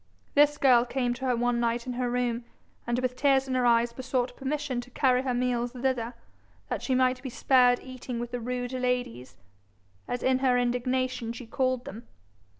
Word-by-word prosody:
This 295 0 +4
girl 250 -4 +5
came 245 0 -1
to 260 +2 -6
her 250 - +2
one 240 0 +1
night 235 0 0
in 250 - -4
her 245 0 -1
room, 240 -1 -1 0.4
and 240 0 0
with 250 0 -1
tears 270 0 +3
in 260 - -2
her 250 -1 +2
eyes 235 0 +3
besought 255 0 -2
permission 275 -2 -2
to 245 - -14
carry 255 0 +2
her 260 -1 -1
meals 245 -1 -1
thither, 250 -2 -2 0.5
that - - -2
she 260 - 0
might 255 0 +2
be 265 - -5
spared 250 0 +4
eating 255 -2 -6
with 240 0 -5
the 245 - -3
rude 245 +1 -3
ladies, 250 - -2 0.7
as 245 - -3
in 260 0 +3
her 255 -2 +3
indignation 250 0 -1
she 245 +1 -9
called 255 +1 -1
them. 225 +4 -9
250 Hz, 190 wpm, -28 LUFS, 240-255 Hz, 0.7 s, girl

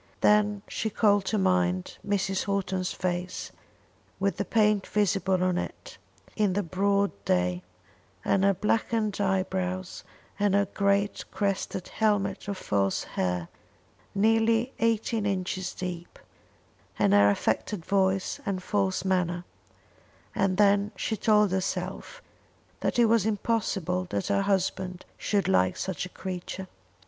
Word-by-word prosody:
Then 210 -1 +3
she 220 - -2
called 205 -2 +3
to 215 - 0
mind 90 - +1
Mrs. 195 -1 0
Houghton's 190 -2 -1
face, 180 0 -3 0.7
with 195 0 0
the 200 - -1
paint 210 0 +2
visible 190 -2 +1
on 180 -1 +1
it - - -7 0.4
in 210 -3 +2
the 205 +2 0
broad 200 +3 +1
day, 90 -1 +1 0.6
and 195 - +2
her 200 0 +4
blackened 215 +1 0
eyebrows, 185 -1 -1 0.4
and 205 -1 +3
her 200 0 +3
great 200 +1 0
crested 195 -2 -2
helmet 205 -3 0
of 200 -1 -3
false 100 - 0
hair 90 -2 -2 0.7
nearly 225 +4 +3
eighteen 225 -1 +1
inches 185 -1 -2
deep, 175 -2 -6 0.8
and 105 -2 +3
her 100 0 +6
affected 160 - -1
voice 190 -1 +1
and 195 -4 -3
false 195 -2 0
manner, 180 -2 0 0.9
and 195 -2 +1
then 205 0 +4
she 220 - -2
told 210 -2 +3
herself 190 0 -3 0.6
that - - -1
it 240 - +6
was 225 -2 +3
impossible 195 -4 -1
that 190 - -2
her 200 0 +2
husband 190 -2 -1
should 205 -2 0
like 95 -1 +2
such 185 -1 -3
a - - -17
creature. 185 +1 -6
195 Hz, 130 wpm, -27 LUFS, 180-205 Hz, 0.9 s, her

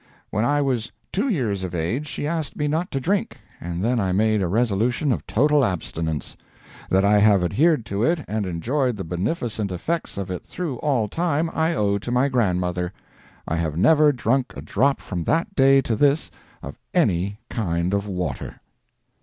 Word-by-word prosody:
When 105 - 0
I 145 +2 +2
was 125 -5 -1 0.2
two 225 +8 0
years 115 - 0
of 90 -1 -4
age 110 - -2
she 145 - -4
asked 160 -1 -2
me 150 - -1
not 160 +4 -1
to 135 - -2
drink, 195 +8 -1 0.2
and 85 +1 -4
then 120 +2 +1
I 95 -3 0
made 110 +2 +2
a 90 - +1
resolution 120 - +1
of - - -2
total 145 +4 +3
abstinence. 80 - -2 0.5
That 95 +1 +3
I 105 +1 +5
have 100 -3 +5
adhered 145 - +2
to 100 -1 -3
it 160 +3 +1
and 105 -2 -2
enjoyed 120 - -1
the 95 - -4
beneficent 105 - -2
effects 160 - -3
of 95 -2 -4
it 90 - -5
through 165 -8 -4
all 130 -7 0
time, 165 - 0
I 160 +1 +1
owe 100 -2 +1
to 100 - -6
my 125 +3 +2
grandmother. 90 -7 0 0.6
I 85 - -1
have 80 -2 -2
never 150 - +5
drunk 130 0 0
a - - -5
drop 140 +1 +1
from 90 -4 -4
that 165 +5 0
day 135 -3 +5
to 115 - 0
this 145 +6 +2 0.3
of - - -8 0.2
any 95 +4 +1
kind 85 -4 -1
of 100 0 0
water. 90 -3 -4
115 Hz, 185 wpm, -23 LUFS, 95-145 Hz, 0.6 s, I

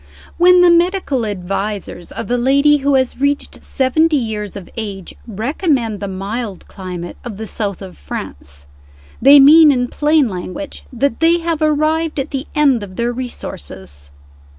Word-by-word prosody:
When 360 +1 +6
the 355 -1 +6
medical 340 - +1
advisers 195 -1 -5
of - - -6
a - - +3
lady 280 +4 +3
who 280 0 +1
has 260 -1 0
reached 285 0 -1
seventy 305 +4 +1
years 215 -5 -4
of 195 -3 -8
age 200 -5 -6
recommend 230 - -1
the 200 - -4
mild 195 +2 -5
climate 180 -3 -8
of 230 -5 -7
the 220 - -6
South 200 -2 -4
of 90 -5 -11
France, 70 0 -8 0.6
they 280 +3 +8
mean 300 +2 +8
in 250 -2 0
plain 300 -2 +2
language 185 +9 -7
that 260 0 -1
they 330 +1 +4
have 330 -2 -2
arrived 310 +1 +1
at 275 +2 -4
the 275 0 -4
end 280 -6 +3
of 190 -2 -9
their 235 +3 -1
resources. 70 - -7
245 Hz, 155 wpm, -17 LUFS, 200-295 Hz, 0.6 s, they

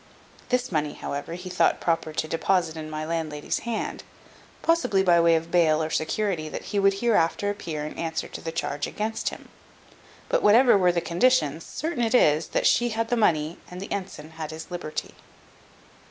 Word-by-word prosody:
This 250 -2 0
money, 150 -3 0
however, 145 +4 -5
he 180 +1 -8
thought 180 - +2
proper 165 -2 0
to 155 0 -2
deposit 165 0 0
in 155 -1 -6
my 155 0 -4
landlady's 155 -2 -2
hand, 225 - -3 0.6
possibly 250 -13 +2
by 175 -2 +5
way 165 0 +5
of 165 +1 -2
bail 160 -3 +3
or 155 - -3
security 160 -1 -1
that - - -6
he 205 - +2
would 195 0 +4
hereafter 205 -2 +1
appear 160 -7 -5
and 155 - -7
answer 160 -1 -2
to - - -8
the 165 - -4
charge 145 -3 -2
against 220 +1 -2
him; - - -12 0.8
but - - +1
whatever 235 +3 +6
were 180 -3 +4
the 170 -1 -1
conditions, 170 - +2
certain 315 -6 -3
it 230 +2 +2
is, 155 -8 +4
that - - -1
she 240 +1 +4
had 230 0 -2
the 245 - +2
money 165 -7 +1
and 180 - -8
the 195 - -8
ensign 185 -6 -5 0.2
his 160 +3 -8
liberty. 170 -3 -5
170 Hz, 185 wpm, -25 LUFS, 155-210 Hz, 0.8 s, whatever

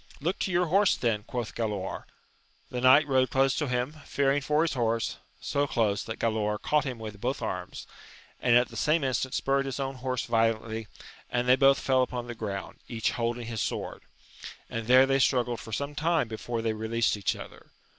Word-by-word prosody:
Look 170 +6 -2
to 190 - -1
your 175 +1 +2
horse 195 +4 +3
then! 115 -4 0
quoth 120 -3 -4
Galaor. 105 -5 -3 0.7
The 125 -1 -3
knight 130 +4 +7
rode 130 -2 +3
close 135 +1 +3
to 150 - 0
him, 125 +4 -1
fearing 140 0 +1
for 150 +3 +2
his 165 - 0
horse; 115 -3 0 0.2
so 145 0 0
close, 105 -6 0
that 115 - -5
Galaor 105 -2 0
caught 150 -2 +1
him 130 -3 -4
with 105 -2 -8
both - - -2
arms, - - -5 0.5
and 120 -1 +3
at 125 +1 +4
the - - -12
same 155 0 +2
instant 130 0 -1
spurred 135 0 +1
his 135 - -4
own 135 -1 -3
horse 125 -1 -2
violently, 115 -1 0 0.4
and 125 0 -1
they 125 - +7
both 135 +1 +5
fell 130 -1 +2
upon 125 -1 -2
the 120 - -6
ground, 100 -4 -6
each 115 -2 -1
holding 120 0 -2
his 115 -2 -3
sword, - - -3 0.7
and 115 -1 -4
there 130 +1 +7
they 135 0 +2
struggled 120 -3 +2
for 110 - -10
some 140 +6 -3
time 160 -3 +1
before 115 +1 -4
the^ 110 -1 0
released 110 +1 0
each 100 -3 -1
other. - - -11
125 Hz, 195 wpm, -28 LUFS, 115-135 Hz, 0.7 s, knight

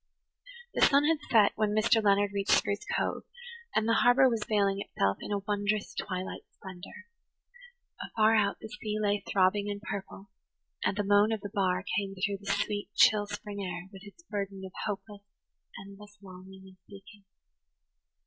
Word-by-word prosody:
The - - -2
sun 280 0 +5
had 320 0 +2
set 215 -3 +5
when 215 -1 0
Mr. 220 +1 +3
Leonard 200 0 +3
reached 200 0 +1
Spruce 200 0 -2
Cove, - - -1 0.5
and 220 - +2
the 230 - +3
harbour 245 +2 +6
was 230 -3 0
veiling 200 -2 +2
itself 100 - -1
in - - -6
a 200 -1 -1
wondrous 205 0 -1
twilight 185 -1 -4
splendour. 190 -2 -11 1.0
Afar 220 0 +2
out, 205 -2 +2
the - - -8
sea 215 0 -5
lay 205 -1 0
throbbing 200 +2 +2
and 205 0 -4
purple, 200 -1 -7 0.5
and 195 - 0
the 205 - +1
moan 205 +2 +4
of 220 -2 -2
the 205 -1 -7
bar 185 -2 +1 0.2
came 195 -1 -5
through 195 +1 -2
the 200 - -2
sweet, 205 -1 -2
chill 205 -1 +5
spring 205 -1 -6
air 180 0 -6
with 190 - -11
its 210 +11 -15
burden 200 - -5
of 190 - -9 0.2
hopeless, 205 0 -6 0.6
endless 205 +1 -14
longing 190 0 -13
and 190 -1 -16
seeking. 200 0 -14
205 Hz, 170 wpm, -29 LUFS, 195-210 Hz, 1.0 s, harbour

